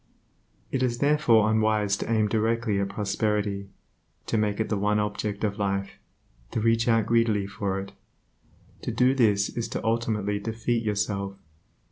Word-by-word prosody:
It 130 - -1
is 120 -2 +1
therefore 135 -6 +4
unwise 110 -2 +2
to 115 - -4
aim 110 -2 +3
directly 110 -1 0
at 100 0 -1
prosperity, 100 -1 -1 0.6
to - - -2
make 105 -1 0
it 110 - 0
the 105 - -1
one 105 +1 +1
object 105 0 -2
of 105 0 -1
life, 100 -1 -2 0.5
to - - -2
reach 115 +1 +2
out 115 -2 +3
greedily 115 -3 +2
for 100 0 -3
it, 100 0 -7 0.9
To - - -4
do 125 +1 +3
this 105 -6 +3
is 115 - -3
to - - -5
ultimately 110 -3 0
defeat 115 +2 -1
yourself. 100 -2 -2
105 Hz, 155 wpm, -26 LUFS, 100-115 Hz, 0.9 s, therefore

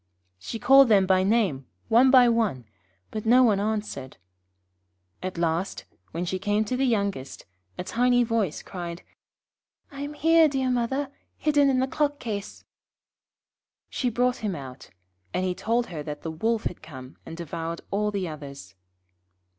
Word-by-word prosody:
She 160 - -6
called 270 +2 +6
them 200 -3 +5
by 185 0 +3
name, 190 - +1 0.2
one 240 +3 +5
by 255 -2 +7
one, 220 - 0 0.5
but 215 - -4
no 245 +3 +5
one 210 -5 +3
answered. 205 -11 -3 1.0
At 185 -1 -5
last, 170 +3 -1 0.2
when 170 +2 -4
she 185 +1 -2
came 205 +2 0
to 250 - -2
the 265 +1 +1
youngest, 200 - -2 0.3
a - - -3
tiny 245 +4 +2
voice 225 -8 -1
cried: 175 -2 -7 0.9
'I 280 0 -8
am 290 +1 -5
here, 325 +1 +5
dear 265 -3 0
mother, 265 +3 -1 0.3
hidden 290 -2 +3
in 265 - +2
the 260 +1 +1
clock 290 +1 0
case.' 210 -6 -6 1.3
She 250 - -1
brought 245 +2 +1
him 210 -5 -3
out, 135 -3 -10 0.5
and 185 - 0
he 185 - 0
told 230 +5 0
her 155 - -4
that 150 0 -7
the 160 - -3
Wolf 220 +8 -1
had 180 - -4
come 130 -4 -11
and 165 - -9
devoured 165 0 -5
all 210 +1 0
the 200 -3 -2
others. 140 - -9
210 Hz, 160 wpm, -26 LUFS, 170-245 Hz, 1.3 s, by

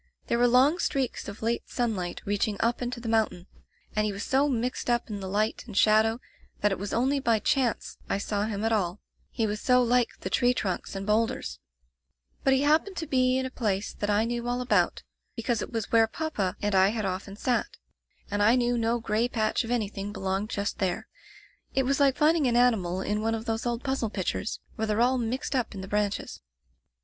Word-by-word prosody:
There 235 - 0
were 245 - +5
long 265 +8 +4
streaks 270 -7 -1
of 200 +2 -8
late 230 +1 -1
sunlight 210 -8 -2
reaching 205 +1 0
up 235 +2 +1
into 245 0 -3
the 235 - -7
moun 225 -1 +3
tain 180 +1 -13 0.5
and 215 - +2
he 210 - 0
was 200 0 -5
so 280 +2 +2
mixed 245 -1 -2
up 240 -1 0
in 205 - -4
the 190 -1 -5
light 215 +3 0
and 210 -4 -7
shadow 220 +2 +4 0.4
that 210 - +3
it 195 - -2
was 200 +1 -4
only 265 +4 +1
by 230 -4 +2
chance 245 +2 0
I - - +1
saw 205 0 -1
him 215 0 -3
at 225 - +1
all, 195 -3 0 0.3
he 225 - -1
was 210 0 -3
so 250 -1 +4
like 245 0 +3
the 185 - -4
tree 245 +4 +3
trunks 190 -2 -3
and 195 0 -4
bowlders; 220 +2 0 0.8
but 270 - +3
he 265 +1 +3
happened 315 +6 +2
to 325 - -2
be 255 -3 +2
in 260 - -1
a 260 - -5
place 205 -5 -1
that 205 - -3
I 210 +2 +3
knew 240 0 -3
all 245 0 0
about, 250 0 +1 0.3
because 230 -1 -1
it - - -5
was 225 -3 -3
where 225 -1 +5
papa 220 - -2
and 205 0 +1
I 190 0 +6
had 215 0 -1
often 195 +1 -4
sat, 245 - -1 0.5
and 205 0 0
I 220 +4 +5
knew 245 -1 +1
no 230 +1 +1
gray 225 +1 0
patch 220 0 0
of 230 - -7
anything 205 -4 -2
belonged 195 +1 -2
just 200 -1 -3
there. 185 -2 -1 0.7
It 265 - +3
was 275 +2 +1
like 275 -2 +4
finding 305 -2 +3
an 240 - +1
animal 195 -7 +2
in 210 +2 -1
one 225 +1 0
of 225 0 -6
those 225 +1 -2
old 235 0 -2
puzzle 265 -5 -1
pictures, 205 +1 -3 0.2
where 220 0 -1
they're 215 +1 0
all 250 +2 +3
mixed 245 +4 -2
up 245 -4 -1
in 190 - -5
the 190 - -7
branches. 205 0 -2
225 Hz, 220 wpm, -27 LUFS, 205-250 Hz, 0.8 s, I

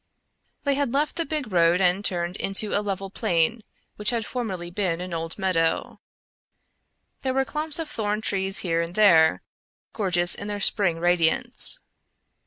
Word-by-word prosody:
They 280 - +1
had 275 -3 -1
left 295 +2 -1
the 335 - 0
big 300 -8 -4
road 170 0 +3
and 185 +1 +1
turned 175 -2 -2
into 195 +2 +1
a 205 - +1
level 195 -1 -5
plain 205 +2 0 0.4
which 210 0 +1
had 230 -3 -1
formerly 190 -9 -5
been 180 -3 -1
an 180 0 -6
old 165 0 -4
meadow. 180 -4 -1 1.2
There 260 -1 -2
were 270 0 +1
clumps 305 +1 -2
of 325 -2 -4
thorn 215 -7 -3
trees 195 -2 0
here 165 -1 0
and 170 +1 -6
there, 165 -7 +4 0.5
gorgeous 175 -4 +2
in 205 - -4
their 205 0 -4
spring 195 -4 +3
radiance. 175 - +3
195 Hz, 160 wpm, -24 LUFS, 175-230 Hz, 1.2 s, there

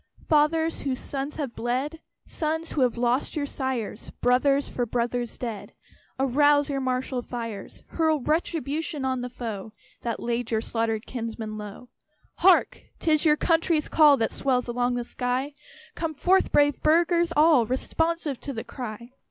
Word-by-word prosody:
_ - - -21
"Fathers, 320 +2 +2
whose 265 -2 -2
sons 275 +3 -4
have 280 -6 -4
bled! 260 +7 -2 0.3
Sons, 320 +1 -3
who 290 - -1
have 245 -2 +2
lost 245 +2 0
your 295 -2 -1
sires, 260 -6 -3
Brothers, 275 +3 +3
for 245 -1 -2
brothers 240 0 -2
dead! 210 -5 -6 0.4
Arouse 290 +2 +3
your 275 -1 -1
martial 255 0 -1
fires. 230 -4 -7
Hurl 315 -2 +1
retribution 305 0 -1
on 260 -1 -1
the 250 - -4
foe 220 -4 -6 0.3
That 235 -1 -3
laid 235 0 -2
your 220 - +1
slaughtered 225 0 -2
kinsmen 225 -3 -5
low." 210 +3 -9 0.5
Hark! 370 +1 +4 0.2
'tis 310 -1 +2
your 300 -1 +5
country's 330 -2 +2
call 300 -3 +6
That 225 - 0
swells 250 -2 0
along 245 +1 0
the 245 - -2
sky; 250 +4 -2 0.4
Come 320 -2 -3
forth, 370 +6 +3
brave 290 -1 +3
Burghers 340 +2 +3
all, 300 -7 +5
Responsive 320 +2 -1
to 280 - -6
the 225 - -5
cry! 235 -1 -7
260 Hz, 155 wpm, -26 LUFS, 240-305 Hz, 0.5 s, call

